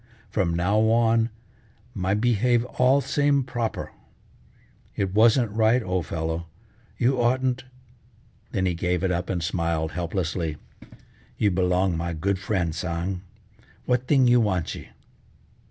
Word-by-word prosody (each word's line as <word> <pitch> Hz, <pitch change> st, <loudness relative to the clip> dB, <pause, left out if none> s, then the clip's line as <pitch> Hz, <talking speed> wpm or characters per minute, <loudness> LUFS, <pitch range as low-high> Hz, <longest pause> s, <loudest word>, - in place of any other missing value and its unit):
From 85 Hz, -5 st, 0 dB
now 95 Hz, +5 st, +2 dB
on 115 Hz, 0 st, +3 dB, 0.6 s
my 95 Hz, +2 st, 0 dB
behave 120 Hz, +2 st, +2 dB
all 130 Hz, +2 st, +3 dB
same 145 Hz, -1 st, +2 dB
proper. 120 Hz, -3 st, -3 dB, 1.0 s
It 95 Hz, -1 st, -1 dB
wasn't 115 Hz, +1 st, +4 dB
right, 110 Hz, +3 st, +3 dB
old 90 Hz, -3 st, -2 dB
fellow, 80 Hz, +1 st, -3 dB, 0.5 s
you 125 Hz, 0 st, +2 dB
oughtn't 130 Hz, +1 st, +1 dB, 0.4 s
" 115 Hz, 0 st, -33 dB
then 95 Hz, -4 st, 0 dB
he 90 Hz, -, +1 dB
gave 90 Hz, +1 st, -1 dB
it 95 Hz, -, +1 dB
up 90 Hz, +1 st, -2 dB
and 90 Hz, -3 st, -1 dB
smiled 85 Hz, -2 st, -1 dB
helplessly, 85 Hz, -2 st, -2 dB, 0.8 s
"you 105 Hz, -, +2 dB
belong 90 Hz, 0 st, +1 dB
my 85 Hz, +1 st, -3 dB
good 95 Hz, +4 st, -1 dB
friend 95 Hz, -5 st, -1 dB
Tsang, 85 Hz, +2 st, -3 dB, 0.6 s
what 125 Hz, 0 st, 0 dB
thing 135 Hz, -3 st, +4 dB
you 120 Hz, 0 st, +5 dB
wantchee?" 95 Hz, -6 st, -2 dB
100 Hz, 130 wpm, -25 LUFS, 90-120 Hz, 1.0 s, you